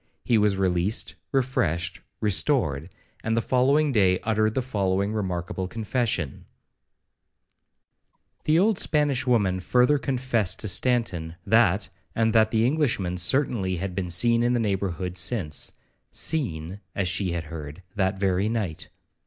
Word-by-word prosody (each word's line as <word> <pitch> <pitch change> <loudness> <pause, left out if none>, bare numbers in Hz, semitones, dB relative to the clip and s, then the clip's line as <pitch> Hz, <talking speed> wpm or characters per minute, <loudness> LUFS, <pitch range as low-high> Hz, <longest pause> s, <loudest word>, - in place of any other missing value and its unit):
He 115 -2 +2
was 105 -2 +2
released, 95 +2 0 0.2
refreshed, 95 - -1 0.2
restored, 95 - +1 0.3
and 115 +1 0
the - - +4
following 140 +4 +2
day 95 -6 +3
uttered 110 -1 0
the 130 - 0
following 100 -3 -1
remarkable 95 -2 -3
confession 110 - -2 2.0
The 155 +1 +3
old 200 +2 +2
Spanish 145 -4 0
woman 100 -7 +2
further 125 +9 +3
confessed 125 -7 -1
to 110 - -3
Stanton, 90 -5 0
that 110 -3 +3 0.3
and 115 -1 +1
that 110 -1 +4
the 110 0 +2
Englishman 120 - 0
certainly 95 -2 +1
had 90 +1 -4
been 90 -1 -3
seen 115 +7 +4
in 120 +1 +2
the 120 - +1
neighbourhood 95 -4 -2
since;—seen, 95 - -1 0.2
as 95 -3 0
she 90 0 0
had 85 -1 -3
heard, 75 +2 -9
that 95 -1 0
very 95 +1 +1
night. 105 -9 -3
105 Hz, 130 wpm, -25 LUFS, 90-120 Hz, 2.0 s, the